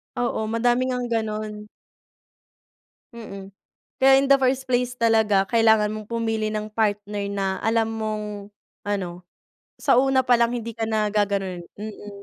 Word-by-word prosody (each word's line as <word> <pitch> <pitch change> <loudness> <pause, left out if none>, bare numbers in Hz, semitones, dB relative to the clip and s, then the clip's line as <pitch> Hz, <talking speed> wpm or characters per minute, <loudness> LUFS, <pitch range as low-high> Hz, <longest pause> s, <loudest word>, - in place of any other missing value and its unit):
Oo, 240 -2 -1
madami 240 +3 +1
ngang 250 -1 -2
gano'n. 215 -1 -3 1.5
Mm. 200 -4 -9 0.5
Kaya 270 0 +6
in 275 - 0
the 275 - +7
first 260 0 0
place 250 0 0
talaga 220 -4 +3
kailangan 220 -2 +4
mong 215 0 -6
pumili 225 -2 -1
ng 215 0 -3
partner 205 -1 -1
na 195 -1 -1
alam 225 0 +2
mong, 215 -1 -3 0.6
ano, 180 -3 -3 0.6
sa - - +3
una 270 0 +3
palang 240 -1 +3
hindi 230 -1 -4
ka 225 - -2
na 215 -1 0
gaganonin. 195 -4 -1
Mm. 205 -1 -9
220 Hz, 135 wpm, -23 LUFS, 210-235 Hz, 1.5 s, the